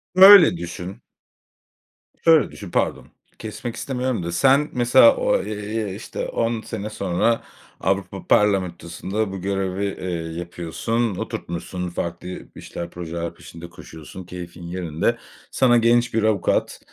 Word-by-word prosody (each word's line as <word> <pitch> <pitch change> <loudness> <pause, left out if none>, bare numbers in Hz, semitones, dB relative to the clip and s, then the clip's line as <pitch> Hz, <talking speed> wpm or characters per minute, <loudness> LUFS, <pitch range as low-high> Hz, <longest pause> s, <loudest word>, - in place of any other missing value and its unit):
M 185 - +2
öyle 195 - +10
düşün 90 +2 -7 1.2
şöyle 160 -6 +5
düşün. 95 -4 -10
Pardon - - -1 0.3
kesmek 115 +2 -6
istemiyorum 125 -7 -2
da, 85 - -3
sen 135 - +3
mesela 120 0 +6
o, - - +1
eee, 105 -1 -4
işte, 110 - -5
10 115 -1 -1
sene 105 -2 -5
sonra 105 +2 0 0.4
Avrupa 95 -1 -2
Parlamentosu’nda 95 0 0
bu 95 -1 -6
görevi, 95 0 -2
eee, 85 -4 -4
yapıyorsun, 85 +6 -2
oturtmuşsun, 90 +1 -5
farklı 85 0 -5
bir 90 - -9
işler, 85 0 -7
projeler 85 -1 -5
peşinde 85 +1 -11
koşuyorsun, 80 +2 -11
keyfin 90 0 -9
yerinde. 90 +5 -1 0.3
Sana 120 -2 +4
genç 120 +1 +3
bir 110 -1 +1
avukat, 105 -4 +1
95 Hz, 130 wpm, -22 LUFS, 85-115 Hz, 1.2 s, öyle